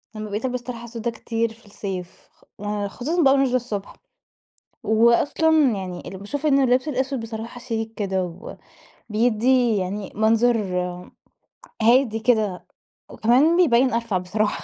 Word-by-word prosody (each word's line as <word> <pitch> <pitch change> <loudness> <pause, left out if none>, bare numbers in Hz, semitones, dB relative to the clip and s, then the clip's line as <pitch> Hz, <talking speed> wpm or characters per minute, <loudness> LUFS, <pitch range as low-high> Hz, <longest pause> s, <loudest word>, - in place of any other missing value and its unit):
لما 215 0 -6
بقيت 210 +4 -3
ألبس 250 -1 -2
طرحة 240 -1 -7
سودا 235 0 -4
كتير 230 0 -2
في 225 0 -21
الصيف 190 -3 -7
خ - - -30 0.2
آآ 205 0 -2
خصوصًا 295 - -2
بقى 270 - +6
وأنا 275 0 +3
نازلة 255 -2 +1
الصبح 225 -5 -3 0.9
وأصلًا 235 +8 +3 0.3
يعني 185 -2 -6
اللي 190 - -7
باشوف 265 +10 -5
إنه 275 -2 +4
اللبس 255 +3 +2
الأسود 265 -1 -1
بصراحة 225 +1 -7
شيك 225 -2 -4
كده، 190 -3 -1 0.9
وبيدِّي 235 +2 +2
يعني 195 +1 -3
منظر 225 +2 +3 1.3
هادي 230 0 +4
كده 220 -5 +1 0.4
وكمان 265 +9 +3
بيبين 260 -8 +4
أرفع 230 -4 0
بصراحة. 205 +4 -2
230 Hz, 140 wpm, -23 LUFS, 210-250 Hz, 1.3 s, بقى